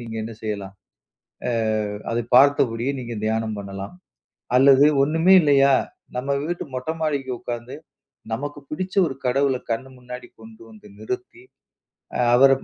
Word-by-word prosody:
நீங்க 115 Hz, -1 st, -8 dB
என்ன 115 Hz, +1 st, -6 dB
செய்யலாம்? 100 Hz, -2 st, -4 dB, 0.8 s
அ -, -, 0 dB, 0.6 s
அத 115 Hz, -, 0 dB, 0.2 s
பாத்தபடியே 130 Hz, -2 st, +4 dB
நீங்க 120 Hz, -1 st, -6 dB
தியானம் 110 Hz, 0 st, -1 dB
பண்ணலாம். 100 Hz, -, -7 dB, 0.6 s
அல்லது 135 Hz, +1 st, +7 dB, 0.2 s
ஒண்ணுமே 160 Hz, +6 st, +4 dB
இல்லையா, 140 Hz, -2 st, +5 dB, 0.4 s
நம்ம 125 Hz, +2 st, -3 dB, 0.2 s
வீட்டு 175 Hz, +2 st, -3 dB
மொட்டை 130 Hz, +5 st, -3 dB
மாடிக்கு 140 Hz, -4 st, -1 dB
உக்காந்து, 120 Hz, +1 st, -6 dB, 0.6 s
நமக்கு 145 Hz, +5 st, -4 dB
பிடிச்ச 185 Hz, +5 st, -4 dB
ஒரு 135 Hz, -, -4 dB
கடவுள 135 Hz, +1 st, +2 dB
கண்ணு 130 Hz, +4 st, -2 dB
முன்னாடி 125 Hz, 0 st, -9 dB
கொண்டு 110 Hz, 0 st, -14 dB
வந்து 105 Hz, -1 st, -16 dB
நிறுத்தி, 125 Hz, -, -6 dB, 0.7 s
அ -, -, -2 dB, 0.2 s
அவர 135 Hz, +2 st, +7 dB
125 Hz, 135 wpm, -23 LUFS, 115-140 Hz, 0.8 s, அல்லது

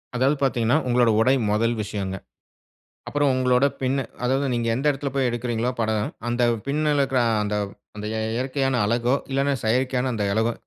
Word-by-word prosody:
அதாவது 130 Hz, +4 st, +2 dB
பாத்தீங்கன்னா, 120 Hz, 0 st, +2 dB
உங்களோட 120 Hz, -1 st, +3 dB
உடை 125 Hz, +4 st, +4 dB, 0.2 s
முதல் 115 Hz, +3 st, +1 dB
விஷயம்ங்க. 100 Hz, -2 st, -4 dB, 0.9 s
அப்புறம் 145 Hz, -1 st, +1 dB
உங்களோட 130 Hz, +1 st, +3 dB, 0.2 s
பின் 130 Hz, +1 st, +1 dB, 0.3 s
அதாவது 135 Hz, +3 st, +1 dB
நீங்க 120 Hz, -1 st, -1 dB
எந்த 135 Hz, +4 st, -3 dB
இடத்துல 140 Hz, 0 st, -4 dB
போய் 135 Hz, -2 st, +2 dB
எடுக்கிறீர்களோ 120 Hz, 0 st, -1 dB
படம் 110 Hz, -1 st, 0 dB, 0.2 s
அந்த 120 Hz, +1 st, 0 dB, 0.2 s
பின்ல 150 Hz, +2 st, +1 dB
இருக்கிற 135 Hz, -2 st, +2 dB, 0.2 s
அந்த, 105 Hz, 0 st, -2 dB, 0.4 s
அந்த 105 Hz, 0 st, -6 dB
எ -, -, -1 dB
இயற்கையான 130 Hz, +1 st, 0 dB
அழகோ 120 Hz, +4 st, +1 dB, 0.2 s
இல்லனா, 140 Hz, +1 st, +1 dB
செயற்கையான 125 Hz, +2 st, +1 dB
அந்த 105 Hz, -3 st, -1 dB
அழகோ 110 Hz, +1 st, +1 dB
125 Hz, 160 wpm, -23 LUFS, 115-135 Hz, 0.9 s, உடை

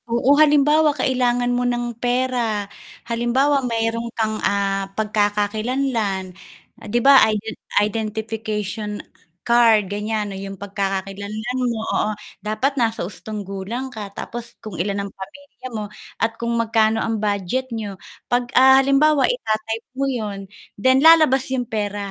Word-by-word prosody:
Oo, 240 Hz, +4 st, +3 dB
halimbawa 295 Hz, 0 st, +4 dB
kailangan 245 Hz, -1 st, +1 dB
mo 245 Hz, -, 0 dB
ng 240 Hz, -1 st, -1 dB
pera, 245 Hz, -4 st, 0 dB, 0.4 s
halimbawa 245 Hz, +5 st, +1 dB
mayroon 230 Hz, -1 st, -1 dB
kang, 220 Hz, -1 st, -1 dB
ah, 195 Hz, -1 st, 0 dB
pagkakakilanlan. 210 Hz, -1 st, -1 dB, 0.5 s
'Di 225 Hz, +2 st, -1 dB
ba, 275 Hz, -1 st, +8 dB
iden 215 Hz, +1 st, -3 dB, 0.2 s
identification 215 Hz, -1 st, -2 dB, 0.5 s
card, 235 Hz, -3 st, +5 dB
ganyan 210 Hz, 0 st, -2 dB
'no, -, -, -6 dB
'yong 195 Hz, 0 st, -7 dB
pagkakakilanlan 200 Hz, +4 st, -4 dB
mo, 225 Hz, -2 st, -3 dB
oo, 210 Hz, -, +1 dB, 0.3 s
dapat 215 Hz, +7 st, -1 dB
nasa 225 Hz, -5 st, 0 dB
hustong 210 Hz, +2 st, -7 dB
gulang 210 Hz, +7 st, -5 dB
ka, 210 Hz, -3 st, -6 dB
tapos 235 Hz, +2 st, -8 dB
kung 215 Hz, -, -9 dB
ilan 200 Hz, +1 st, -2 dB
ang 200 Hz, -, -8 dB
pamilya 275 Hz, +7 st, -11 dB
mo 215 Hz, -3 st, -4 dB, 0.3 s
at 225 Hz, 0 st, 0 dB
kung 235 Hz, 0 st, -1 dB
magkano 225 Hz, -1 st, +2 dB
ang 225 Hz, -2 st, -2 dB
budget 210 Hz, +5 st, -1 dB
n'yo. 215 Hz, -4 st, -5 dB, 0.3 s
'Pag, 245 Hz, +1 st, -1 dB
ah, 265 Hz, +1 st, +7 dB
halimbawa 275 Hz, +2 st, +3 dB
ita-type 225 Hz, -, -2 dB
mo 275 Hz, -, 0 dB
'yon 205 Hz, -6 st, -4 dB, 0.3 s
then 260 Hz, +2 st, +5 dB
lalabas 310 Hz, -5 st, +6 dB
'yong 245 Hz, -3 st, -2 dB
pera. 205 Hz, -2 st, -3 dB
225 Hz, 135 wpm, -21 LUFS, 205-250 Hz, 0.5 s, ba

